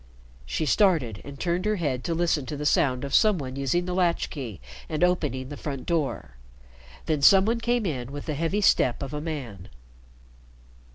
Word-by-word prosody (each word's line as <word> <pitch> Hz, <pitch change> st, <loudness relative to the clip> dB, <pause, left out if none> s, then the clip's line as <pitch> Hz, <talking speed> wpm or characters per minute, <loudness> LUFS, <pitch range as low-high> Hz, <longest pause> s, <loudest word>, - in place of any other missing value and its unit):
She 155 Hz, -, -1 dB
started 155 Hz, -, +2 dB
and 140 Hz, -1 st, -10 dB
turned 175 Hz, +2 st, -1 dB
her 215 Hz, 0 st, +2 dB
head 140 Hz, -9 st, -2 dB
to 165 Hz, -, -1 dB
listen 160 Hz, -5 st, 0 dB
to 150 Hz, -, -4 dB
the 150 Hz, -, -4 dB
sound 130 Hz, -3 st, +2 dB
of 140 Hz, -1 st, -5 dB
some 215 Hz, -3 st, +5 dB
one 130 Hz, -4 st, -6 dB
using 140 Hz, +6 st, 0 dB
the 180 Hz, -, -3 dB
latch 180 Hz, -2 st, +1 dB
key 120 Hz, -, -6 dB, 0.3 s
and 155 Hz, +2 st, -1 dB
opening 150 Hz, -8 st, 0 dB
the 145 Hz, -, -7 dB
front 140 Hz, -3 st, -5 dB
door. 150 Hz, -, -2 dB, 0.7 s
The 155 Hz, -2 st, 0 dB
some 190 Hz, +6 st, +7 dB
one 230 Hz, +2 st, +1 dB
came 240 Hz, -1 st, 0 dB
in 130 Hz, -7 st, -3 dB
with 145 Hz, 0 st, -7 dB
the 155 Hz, -, -2 dB
heavy 165 Hz, +7 st, -1 dB
step 130 Hz, -, +3 dB
of 135 Hz, +1 st, -6 dB
a 150 Hz, -, -3 dB
man. 130 Hz, -, -6 dB
150 Hz, 190 wpm, -26 LUFS, 135-180 Hz, 0.7 s, some